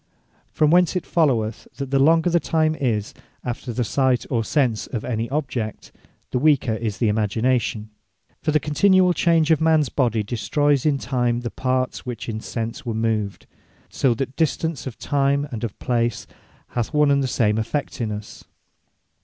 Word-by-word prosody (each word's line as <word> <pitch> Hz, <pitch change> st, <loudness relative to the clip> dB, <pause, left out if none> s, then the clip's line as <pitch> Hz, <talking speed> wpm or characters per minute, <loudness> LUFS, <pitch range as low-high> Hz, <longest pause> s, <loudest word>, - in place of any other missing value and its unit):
From 155 Hz, -1 st, +2 dB
whence 180 Hz, +1 st, +4 dB
it 180 Hz, -, -2 dB
followeth, 120 Hz, -10 st, 0 dB
that 140 Hz, -2 st, -5 dB
the 135 Hz, -, +3 dB
longer 165 Hz, +5 st, +4 dB
the 170 Hz, -, +4 dB
time 155 Hz, -1 st, +1 dB
is, 115 Hz, -8 st, -1 dB, 0.3 s
after 125 Hz, 0 st, -4 dB
the 120 Hz, +2 st, -1 dB
sight, 130 Hz, +1 st, +1 dB
or 115 Hz, -3 st, +1 dB
Sense 120 Hz, -3 st, 0 dB
of 115 Hz, -, -4 dB
any 115 Hz, -1 st, -2 dB
object, 130 Hz, -6 st, -3 dB, 0.4 s
the 125 Hz, -, 0 dB
weaker 140 Hz, -5 st, +3 dB
is 110 Hz, -1 st, -3 dB
the 115 Hz, -, +1 dB
Imagination. 110 Hz, +1 st, 0 dB, 0.5 s
For 155 Hz, -, -1 dB
the 155 Hz, 0 st, +3 dB
continuall 180 Hz, +5 st, +3 dB
change 165 Hz, -2 st, +2 dB
of 160 Hz, -, +3 dB
mans 160 Hz, -3 st, +3 dB
body, 115 Hz, -5 st, +1 dB
destroyes 145 Hz, +6 st, +1 dB
in 145 Hz, -2 st, +2 dB
time 120 Hz, -3 st, -1 dB
the 120 Hz, -, -4 dB
parts 130 Hz, 0 st, -1 dB
which 125 Hz, -2 st, -6 dB
in 110 Hz, -2 st, -3 dB
sense 115 Hz, +5 st, -5 dB
were 115 Hz, -4 st, -3 dB
moved: 110 Hz, -3 st, -1 dB, 0.4 s
So 125 Hz, -4 st, +1 dB
that 135 Hz, -, -1 dB
the 135 Hz, -, -24 dB
distance 160 Hz, -1 st, -2 dB
of 125 Hz, -, -7 dB
time, 140 Hz, 0 st, +1 dB
and 115 Hz, -2 st, -5 dB
of 115 Hz, -4 st, -4 dB
place, 120 Hz, -2 st, -1 dB, 0.4 s
hath 120 Hz, +3 st, -3 dB
one 150 Hz, -1 st, +4 dB
and 140 Hz, 0 st, +3 dB
the 135 Hz, -, 0 dB
same 110 Hz, -3 st, +1 dB
effect 125 Hz, +4 st, -3 dB
in 110 Hz, -2 st, -1 dB
us. 105 Hz, 0 st, -8 dB
130 Hz, 180 wpm, -22 LUFS, 115-150 Hz, 0.5 s, whence